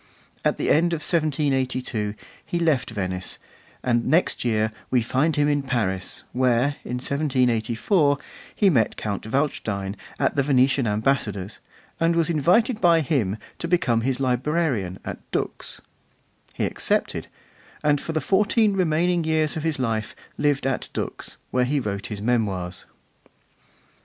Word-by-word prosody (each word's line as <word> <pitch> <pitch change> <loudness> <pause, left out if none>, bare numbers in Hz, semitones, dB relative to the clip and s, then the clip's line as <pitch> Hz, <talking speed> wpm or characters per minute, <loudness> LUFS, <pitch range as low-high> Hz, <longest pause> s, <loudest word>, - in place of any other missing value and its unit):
At - - +1
the - - +1
end 170 +3 +3
of 160 - -2
1782 130 - 0 0.3
he 175 - -3
left 155 -7 +1
Venice; 95 -4 -3 0.5
and 120 -2 +2
next 170 +3 +2
year 110 -2 +1 0.2
we 125 -3 +2
find 135 +7 +1
him 145 0 +3
in 145 -1 +2
Paris, 105 -8 -2
where, 130 +3 +2
in 125 - -4
1784, 130 - +1 0.4
he 205 - +3
met 115 -8 +2
Count 105 0 -4
Waldstein 100 -8 -1 0.2
at - - +1
the 140 - +3
Venetian 130 -2 +3
Ambassador's, 105 -3 -1 0.4
and 165 0 +3
was 165 0 +2
invited 210 - +3
by 170 -2 +5
him 120 - 0 0.2
to 170 - -3
become 140 -10 +2
his 130 +2 -1
librarian 130 - 0
at - - -5
Dux. - - -3 0.7
He - - 0
accepted, - - -1 0.6
and 145 -1 +3
for 165 - -4
the 155 - +1
fourteen 210 - +3
remaining 175 -1 +2
years 155 -1 +1
of 160 - -2
his 160 -1 0
life 115 -4 -2 0.2
lived 145 -3 +1
at 135 -1 -1
Dux, - - -4
where 125 0 +2
he 145 +3 +1
wrote 100 -5 -3
his 105 -2 -6
Memoirs. 100 -7 -1
135 Hz, 140 wpm, -24 LUFS, 110-155 Hz, 0.7 s, by